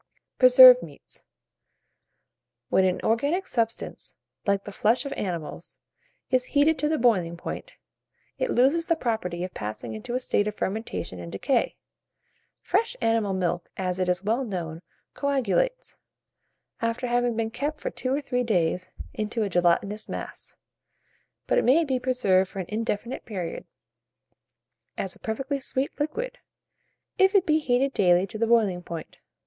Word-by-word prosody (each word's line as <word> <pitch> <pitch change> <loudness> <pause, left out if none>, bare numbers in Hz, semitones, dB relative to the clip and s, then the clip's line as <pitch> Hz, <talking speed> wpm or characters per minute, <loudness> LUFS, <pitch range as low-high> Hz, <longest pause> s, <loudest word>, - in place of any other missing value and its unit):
PRESERVED 255 0 +10
MEATS. 150 -4 -11 1.5
When 190 - +4
an 185 -1 0
organic 285 +12 +1
substance, 230 -6 -2 0.3
like 200 0 +2
the 205 - -8
flesh 225 +7 +1
of 280 - -3
animals, 170 -6 -5 0.5
is 255 -1 +2
heated 300 +1 +4
to 300 +2 +1
the 315 - +1
boiling 185 - +2
point, - - -7 0.7
it - - 0
loses 290 - +3
the 335 - +3
property 220 - -2
of 185 - -5
passing 110 +2 -5
into 110 - -5
a - - +1
state 210 -4 +1
of 210 - -3
fermentation 200 - -4
and 85 -1 -8
decay. 235 - 0 0.9
Fresh 465 +2 0
animal 225 -3 +1
milk, 175 -1 -2
as 185 -1 -2
is 180 0 0
well 225 +6 +1
known, 170 -7 -5 0.3
coagulates, 280 - 0 0.8
after 230 +2 -1
having 245 -1 +1
been 225 0 -1
kept 290 +6 -3
for - - -3
two 255 - -3
or 280 +2 +1
three 250 -3 -1
days, 180 -5 0 0.2
into 215 +1 -2
a 205 - -1
gelatinous 180 +4 +1
mass; - - -6 0.9
but - - +2
it - - 0
may 310 +7 +4
be 260 -3 0
preserved 205 -8 +2
for - - -11
an 190 - -2
indefinite 225 +2 -3
period, 185 -7 -5 1.3
as 190 - -3
a - - -19
perfectly 270 +6 -3
sweet 265 +1 -1
liquid, 315 +13 -3 0.8
if 385 +1 +5
it 385 -2 +5
be 310 -1 +3
heated 270 -1 +1
daily 180 -1 +4
to 215 +3 -8
the 230 - +2
boiling 215 -6 +3
point. 170 -2 -8
230 Hz, 150 wpm, -26 LUFS, 185-265 Hz, 1.5 s, PRESERVED